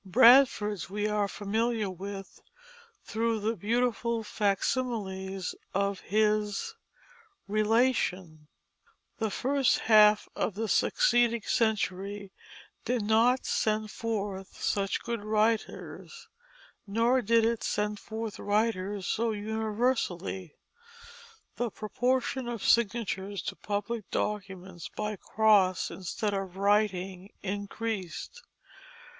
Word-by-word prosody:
Bradford's 225 -2 +5
we 205 +2 -1
are 210 -1 +1
familiar 220 +2 -1
with 195 +1 -7 0.6
through 225 0 -1
the 220 +2 -1
beautiful 235 +2 0
facsimiles 200 -3 -1 0.2
of 200 0 0
his 210 - 0 0.7
Relation. 210 -7 +1 0.7
The 220 -1 0
first 270 +4 +2
half 215 -1 +6
of 200 - -1
the 225 +2 -2
succeeding 240 - +3
century 200 -3 -1 0.5
did 245 -3 0
not 230 +4 +3
send 215 0 0
forth 200 -4 -4
such 195 -1 -1
good 235 -3 -3
writers; 220 - -1 0.6
nor 230 +5 +2
did 230 0 +3
it 230 0 0
send 210 0 -1
forth 220 -1 -6
writers 205 -2 0
so 230 +5 0
universally; 210 - -2 1.0
the 240 -1 -1
proportion 250 +4 -1
of 235 -3 -4
signatures 205 -5 +1
to - - -4
public 210 +1 -4
documents 190 -4 -4
by 210 0 -2
cross 200 -3 +3
instead 205 +3 -3
of 195 -2 -4
writing 195 -2 0
increased. 205 - -4
210 Hz, 95 wpm, -29 LUFS, 195-230 Hz, 1.0 s, half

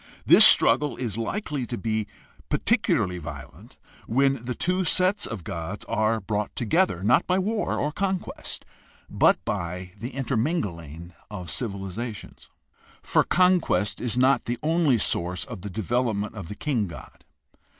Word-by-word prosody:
This - - +8
struggle 145 +2 +6
is 115 -6 -3
likely 140 - -3
to 120 - -4
be 110 -2 -2 0.4
particularly 90 -1 +1
violent 80 - -10 0.3
when 135 +1 +2
the 125 0 -4
two 185 +1 0
sets 185 +4 +2
of 110 -6 -6
gods 85 +6 -6
are 110 0 +1
brought 105 +1 -3
together, 120 - +1
not 120 +6 +3
by 185 - +2
war 210 +3 -1
or 150 - -1
conquest, 190 +2 -4 0.5
but - - +4
by 90 +2 -4
the 120 +5 -6
inter 135 -2 -1
mingling 85 - -3 0.2
of 90 -6 -7
civilizations. 105 0 -5 0.5
For - - +3
conquest 180 - +2
is 120 -1 -2
not 130 +2 +3
the 120 +1 -2
only 160 -5 +3
source 90 -3 -1
of - - -8
the 100 - -6
development 110 +1 -1
of 105 -7 -8
the 105 - -7
king 120 -5 -1
god. 75 -6 -12
115 Hz, 145 wpm, -25 LUFS, 100-145 Hz, 0.5 s, This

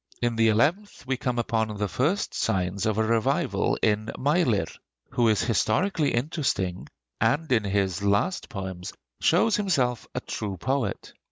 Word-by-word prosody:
In 120 -1 0
the 115 0 +3
eleventh 145 - +1
we 135 0 0
come 125 -1 -2
upon 110 -2 -1
the 105 0 -1
first 150 - 0
signs 95 +2 -1
of 110 -1 0
a 110 - +3
revival 115 0 +1
in 110 0 +1
Meilir, 140 - +2 0.5
who 120 -1 +2
is 110 - +2
historically 145 - +1
interesting, 120 - -1 0.3
and 140 +8 +1
in 115 -4 +3
his 100 -2 0
last 100 - 0
poems 95 -3 -6 0.3
shows 225 - +3
himself 135 - 0
a - - 0
true 100 -3 -5
poet. 130 0 -2
115 Hz, 150 wpm, -26 LUFS, 100-140 Hz, 0.5 s, the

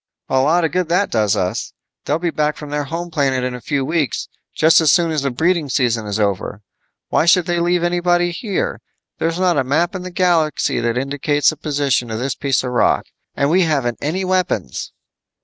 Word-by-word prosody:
"A 130 - +2
lot 165 +6 +2
of 160 - -1
good 180 0 -1
that 180 +4 +1
does 105 -3 +2
us. 90 0 -2 0.3
They'll 150 - +1
be 170 0 -2
back 150 -1 -1
from 150 -1 -8
their 145 0 -2
home 170 +4 -5
planet 135 -4 0
in 125 0 -2
a 125 - -7
few 140 -1 -1
weeks, 155 -5 -1 0.3
just 160 +1 +5
as 155 -4 +4
soon 170 0 +3
as 155 -2 0
the 140 - 0
breeding 160 +3 0
season 120 -5 0
is 105 +1 -2
over. 100 0 -2 0.5
Why - - +2
should 180 0 +5
they 175 -1 0
leave 175 0 +1
anybody 175 0 +1
here? 195 +2 -3 0.4
There's 165 +1 -1
not 180 -4 +2
a - - +1
map 160 +7 0
in 185 - -5
the 185 - -6
galaxy 175 -5 +1
that 115 0 -1
indicates 145 +3 +1
the - - -8
position 140 -5 0
of 110 - -3
this 130 +3 -2
piece 135 -2 0
of 125 - -3
rock. 125 - +2 0.3
And 140 +2 +1
we 185 +3 +4
haven't 140 -8 0
any 180 +6 -2
weapons." 185 0 -1
150 Hz, 210 wpm, -19 LUFS, 130-175 Hz, 0.5 s, just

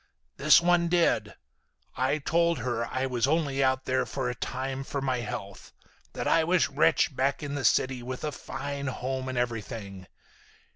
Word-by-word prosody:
"This 150 +3 +7
one 175 0 +3
did. 170 0 +1 0.6
I 130 +4 +1
told 170 +3 +1
her 115 -1 -2
I 130 +2 -2
was 125 -1 0
only 140 -3 +1
out 130 0 +1
there 130 0 0
for 130 -2 -2
a - - -4
time 130 +2 -4
for 140 - -4
my 130 -2 0
health. 100 -3 -7 0.4
That - - -3
I 165 - +4
was 170 -3 +2
rich 150 0 +3
back 135 +3 0
in 145 -1 -4
the 145 -2 -3
city, 130 -1 +2
with 125 +1 -6
a 150 - -1
fine 140 0 -5
home 130 0 -3
and 130 - -4
everything. 110 -5 -4
135 Hz, 175 wpm, -28 LUFS, 125-145 Hz, 0.6 s, This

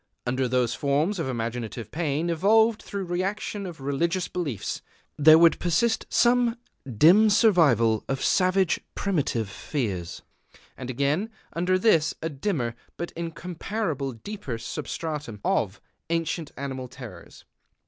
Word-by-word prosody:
Under 130 +1 0
those 125 -1 +1
forms 150 +8 0
of 150 -5 -2
imaginative 115 -2 -4
pain 160 +1 -1
evolved 220 +6 +3
through 200 -1 -5
reaction 195 +3 -3
of 170 -4 -9
religious 165 +7 -1
beliefs, 145 - -3 0.3
there 155 +2 +8
would 165 0 +5
persist 220 +7 +1
some 240 -1 +3 0.4
dim 195 - +7
survival 150 - +4
of 135 -1 -1
savage 185 -1 +2 0.2
primitive 145 - -1
fears, 100 - -4 0.5
and 130 -1 -7
again, 140 - 0 0.2
under 180 +2 +1
this, 185 -6 +3
a 160 - -3
dimmer 140 - -2 0.2
but 170 - -4
incomparably 165 - -4
deeper 200 - -5
substratum 150 -2 -5
of 100 -1 0 0.3
ancient 165 -1 -2
animal 130 -2 -5
terrors. 120 -9 -12
160 Hz, 120 wpm, -26 LUFS, 130-185 Hz, 0.5 s, there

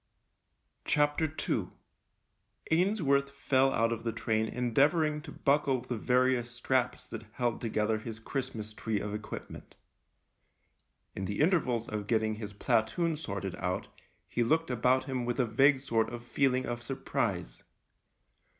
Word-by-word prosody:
II 150 +1 +1 1.0
Ainsworth 160 -6 +3
fell 135 -1 +2
out 115 -1 +2
of 115 -1 -3
the 115 - 0
train 110 -1 0
endeavouring 150 +7 +2
to 150 -1 -9
buckle 140 -3 +2
the 125 0 -4
various 125 +1 +2
straps 125 +1 0
that 115 0 -8
held 120 -3 -1
together 110 -1 0
his 110 0 -6
Christmas 115 -3 -4
tree 110 -1 -2
of 105 0 -4
equipment. 105 0 -7 1.4
In 95 - -3
the 100 +1 -3
intervals 145 - +2
of 105 -1 -4
getting 110 -1 +2
his 105 -2 -6
platoon 110 - +1
sorted 100 - -4
out 90 0 -2 0.4
he 120 - -1
looked 160 +5 +1
about 125 +2 +3
him 130 -2 -2
with 120 +1 -2
a 125 - +4
vague 135 +5 +4
sort 115 -4 +1
of 120 0 -7
feeling 130 0 +1
of 120 0 -3
surprise. 120 - -2
120 Hz, 135 wpm, -31 LUFS, 110-140 Hz, 1.4 s, a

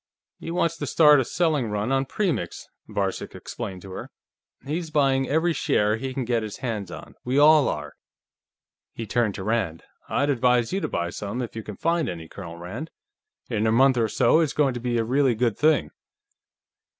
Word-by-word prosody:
He - - -7
wants 170 -1 0
to - - -4
start 150 -3 +6
a - - +2
selling 150 -4 0
run 105 +4 -1
on 135 0 +2
Premix," 150 - -2 0.2
Varcek 95 -2 -3
explained 95 -2 -7
to 95 - -10
her. - - -7 0.6
"He's 160 +4 -3
buying 135 -3 +2
every 160 +3 +2
share 105 -7 +1
he 130 +3 -4
can 130 -1 -3
get 120 -1 +1
his 110 -2 -6
hands 110 -7 -4
on. - - -9
We 125 +2 -1
all 150 0 +6
are." 75 -1 -5 1.0
He 115 - -5
turned 110 -1 0
to 95 - -5
Rand. 105 -7 -1 0.3
"I'd 145 0 +1
advise 125 -1 +2
you 195 - 0
to - - -1
buy 85 0 -2
some, 105 +6 -5
if 120 -3 -5
you 110 - -4
can 105 -2 -9
find 165 -4 0
any, 85 -2 -6
Colonel 85 -2 -9
Rand. 105 - -6 0.6
In 110 -2 0
a - - +3
month 130 +3 +5
or 115 -2 +2
so, 160 - +4
it's 160 -4 +1
going 140 -3 +2
to 120 - -4
be 120 0 -1
a 115 - +2
really 130 +1 +2
good 115 -1 +1
thing." 155 0 +2
125 Hz, 200 wpm, -25 LUFS, 105-145 Hz, 1.0 s, start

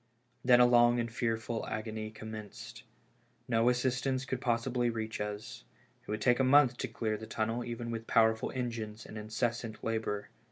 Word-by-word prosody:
Then 125 -1 +6
a 125 - +8
long 120 0 +5
and 115 -1 -2
fearful 115 -1 -1
agony 110 0 -4
commenced. 110 -1 -9 0.7
No 115 +1 +3
assistance 130 +1 0
could 130 -2 -3
possibly 120 0 +1
reach 110 -2 -3
us; 110 +4 -5 0.4
it - - -18
would 105 0 -2
take 120 +1 +3
a - - +4
month 130 -1 +6
to - - -2
clear 110 -2 -2
the 110 +1 -9
tunnel 115 +2 -1
even 120 0 -5
with 115 0 -5
powerful 110 0 +3
engines 115 -3 -4
and - - -10
incessant 110 +1 -3
labor. 110 -2 -2
115 Hz, 165 wpm, -32 LUFS, 110-120 Hz, 0.7 s, a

